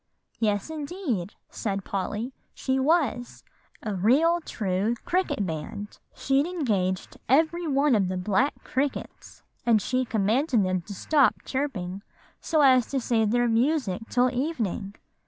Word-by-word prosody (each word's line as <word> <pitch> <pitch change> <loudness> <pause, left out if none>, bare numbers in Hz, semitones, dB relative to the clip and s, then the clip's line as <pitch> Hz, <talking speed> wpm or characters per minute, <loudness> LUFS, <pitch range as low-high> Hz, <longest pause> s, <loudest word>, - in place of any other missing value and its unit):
"Yes, 210 +4 0
indeed," 285 - -3 0.2
said 195 -3 -3
Polly; 210 +6 -3 0.2
"she 265 0 0
was 270 -4 0 0.4
a 215 - -2
real 275 - +3
true 205 - -1
cricket 360 - 0
band. 175 +5 -6 0.2
She'd 275 +3 +1
engaged 205 - -1
every 325 +5 +3
one 280 -1 +3
of 200 -4 +3
the 185 0 -2
black 205 +9 0
crickets; 275 +2 -4 0.2
and 230 -2 +4
she 255 +5 0
commanded 225 +1 +1
them 185 -1 0
to 200 - -6
stop 285 +5 +2
chirping, 200 -10 -3 0.4
so 315 -2 +1
as 255 -4 +5
to 275 - -1
save 225 -3 +1
their 240 +2 +2
music 230 - +1
till 250 0 +3
evening. 230 - -2
240 Hz, 135 wpm, -26 LUFS, 200-285 Hz, 0.4 s, as